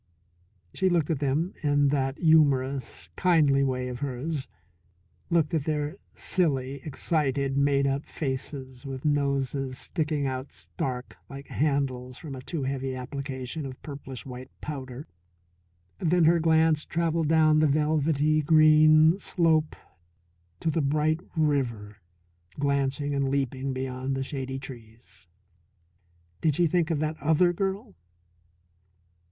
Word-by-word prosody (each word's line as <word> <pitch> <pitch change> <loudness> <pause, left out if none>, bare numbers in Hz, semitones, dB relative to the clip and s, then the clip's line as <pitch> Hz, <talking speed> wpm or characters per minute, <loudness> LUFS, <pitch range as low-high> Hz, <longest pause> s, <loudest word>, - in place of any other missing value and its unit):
She 190 0 +1
looked 170 -3 +1
at 155 - -1
them 150 +7 0
in 145 -1 +3
that 135 -1 0
humorous, 140 -5 +2
kindly 150 -7 +3
way 130 -2 -1
of 125 -1 -5
hers, 140 +2 -3 0.8
looked 170 -2 +2
at 155 -3 0
their 150 +2 -2 0.2
silly, 140 -6 -1
excited, 140 -3 -1
made 140 0 +2
up 140 +1 -1
faces 130 -2 -5
with 135 -1 -7
noses 140 -2 0
sticking 155 -3 -1
out 130 +1 -4
stark, 125 -1 -5
like 140 0 -9
handles, 130 -4 -1
from 150 -4 -8
a 130 - -7
too 150 +2 -4
heavy 135 -1 -2
application 130 +2 -5
of 130 -2 -7
purplish 140 -3 -7
white 130 -1 -8
powder. 135 -2 -6 0.9
Then 175 +1 +2
her 170 +2 +5
glance 160 -1 +3
travelled 165 -1 0
down 155 -1 +4
the 155 - +4
velvety 155 +1 +2
green 155 +2 +6
slope 160 -5 +1 0.9
to 165 - +1
the 160 - 0
bright 155 +3 +1 0.2
river 120 -9 0 0.6
glancing 140 0 0
and 140 -1 0
leaping 135 0 -1
beyond 130 0 -3
the 135 - -1
shady 135 -1 -4
trees. 115 -8 -12 1.1
Did 155 -3 +2
she 175 - +3
think 170 0 +1
of 165 - +1
that 155 0 -2
other 160 +4 +3
girl? 195 - -3
140 Hz, 125 wpm, -27 LUFS, 135-155 Hz, 1.1 s, green